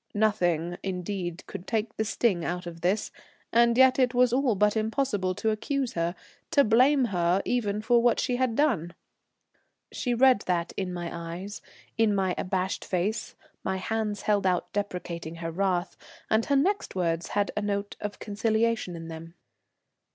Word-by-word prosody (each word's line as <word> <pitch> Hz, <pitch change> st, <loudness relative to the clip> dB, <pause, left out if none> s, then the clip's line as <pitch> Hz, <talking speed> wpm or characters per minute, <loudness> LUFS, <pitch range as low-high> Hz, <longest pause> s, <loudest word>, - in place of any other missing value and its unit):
Nothing, 175 Hz, -5 st, +1 dB
indeed, 180 Hz, -2 st, -4 dB
could 175 Hz, -, -8 dB
take 225 Hz, -1 st, -1 dB
the 220 Hz, -, 0 dB
sting 210 Hz, -5 st, +1 dB
out 175 Hz, +1 st, -3 dB
of 165 Hz, -1 st, -8 dB
this, 190 Hz, +5 st, 0 dB, 0.4 s
and 235 Hz, 0 st, +4 dB
yet 260 Hz, 0 st, +6 dB
it 250 Hz, -1 st, +2 dB
was 250 Hz, -1 st, +4 dB
all 255 Hz, -3 st, +2 dB
but 210 Hz, +2 st, +3 dB
impossible 215 Hz, -4 st, 0 dB
to 220 Hz, -, 0 dB
accuse 265 Hz, +4 st, -2 dB
her, 170 Hz, +1 st, -1 dB, 0.3 s
to 290 Hz, -4 st, +5 dB
blame 255 Hz, +4 st, +4 dB
her 175 Hz, +1 st, +2 dB
even 215 Hz, -4 st, -1 dB
for 235 Hz, +1 st, +4 dB
what 240 Hz, -1 st, +3 dB
she 250 Hz, -2 st, 0 dB
had 255 Hz, -3 st, 0 dB
done. 205 Hz, -, +1 dB, 1.0 s
She 245 Hz, -2 st, -1 dB
read 255 Hz, -1 st, +5 dB
that 175 Hz, -1 st, 0 dB
in 190 Hz, -2 st, -2 dB
my 175 Hz, -1 st, -5 dB, 0.2 s
eyes, 200 Hz, +3 st, -7 dB, 0.4 s
in 215 Hz, -2 st, +4 dB
my 190 Hz, -2 st, +1 dB
abashed 185 Hz, 0 st, -2 dB
face, 195 Hz, +4 st, -2 dB, 0.3 s
my 190 Hz, 0 st, -1 dB
hands 210 Hz, +1 st, -2 dB
held 205 Hz, -2 st, +2 dB
out 180 Hz, -1 st, 0 dB
deprecating 175 Hz, -5 st, -4 dB
her 165 Hz, 0 st, -5 dB
wrath, 180 Hz, 0 st, 0 dB, 0.4 s
and 220 Hz, +1 st, +3 dB
her 280 Hz, -, +2 dB
next 380 Hz, -, +1 dB
words 170 Hz, -2 st, 0 dB
had 205 Hz, -1 st, +1 dB
a 210 Hz, -, 0 dB
note 200 Hz, 0 st, -2 dB
of 205 Hz, -1 st, -4 dB
conciliation 220 Hz, -2 st, 0 dB
in 165 Hz, 0 st, -7 dB
them. 165 Hz, +1 st, -9 dB
205 Hz, 165 wpm, -27 LUFS, 180-230 Hz, 1.0 s, yet